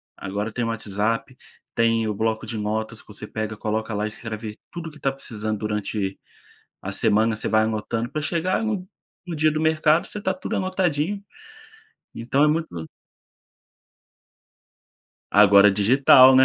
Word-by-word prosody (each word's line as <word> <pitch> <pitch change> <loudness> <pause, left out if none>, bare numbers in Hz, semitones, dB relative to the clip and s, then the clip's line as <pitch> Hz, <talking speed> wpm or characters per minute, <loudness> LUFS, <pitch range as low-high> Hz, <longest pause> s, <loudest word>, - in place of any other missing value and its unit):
agora 105 +3 -4
tem 120 +2 -2
WhatsApp, 115 +2 -2 0.4
tem 115 -1 +2
o 105 - -1
bloco 110 +1 -1
de 110 0 -4
notas 110 +1 -3
que - - -25
você 105 0 -8
pega, 110 0 -4
coloca 110 +1 -2
lá 105 +1 -1
e - - 0
escreve 110 -1 -6
tudo 165 -2 -6
que 150 - -15
tá 135 - +1
precisando 110 -5 -4
durante 105 -2 -2 0.6
a - - -4
semana, 110 +1 +2
você 110 - -2
vai 110 0 +3
anotando 110 +1 -2
pra 155 - -3
chegar 175 +6 0
no 210 -5 -2 0.4
no 170 - -4
dia 155 0 +3
do 155 - -1
mercado, 155 0 +3
você 210 - -6
tá 190 -1 0
tudo 185 - -4
anotadinho. 185 0 -1 0.9
Então 125 +5 0
é 150 - +6
muito 160 +2 +1 2.6
Agora 100 0 +7
é - - +5
digital, 130 +5 +7
né. 130 - +8
115 Hz, 155 wpm, -23 LUFS, 105-155 Hz, 2.6 s, né